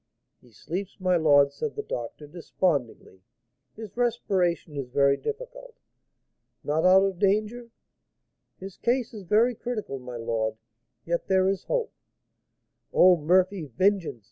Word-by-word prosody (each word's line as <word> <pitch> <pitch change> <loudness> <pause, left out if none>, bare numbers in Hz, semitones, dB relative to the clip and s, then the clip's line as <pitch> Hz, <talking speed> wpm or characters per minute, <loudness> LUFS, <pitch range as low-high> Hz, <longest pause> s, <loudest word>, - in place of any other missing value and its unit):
"He 125 - -22
sleeps, 180 - -6
my 185 -1 +2
lord," 145 -4 +4
said 440 - -4
the 430 - -4
doctor, 120 - -6
despondingly; 145 - -3 0.5
"his 220 -2 -10
respiration 190 -10 0
is 140 -3 -4
very 140 +2 +3
difficult." - - -7 0.9
"Not 155 +3 0
out 190 +1 +6
of 195 -3 -2
danger?" 215 +4 0 0.9
"His 195 0 -10
case 245 0 -1
is 215 - -8
very 225 +7 +3
critical, 215 - -5
my 125 -1 -8
lord; 115 -1 -2 0.5
yet 170 0 -2
there 190 0 +3
is 195 0 -1
hope." 485 -2 -2 1.0
"Oh, 180 0 +6
Murphy! 180 +3 +1
vengeance! 175 - 0
185 Hz, 130 wpm, -26 LUFS, 145-215 Hz, 1.0 s, out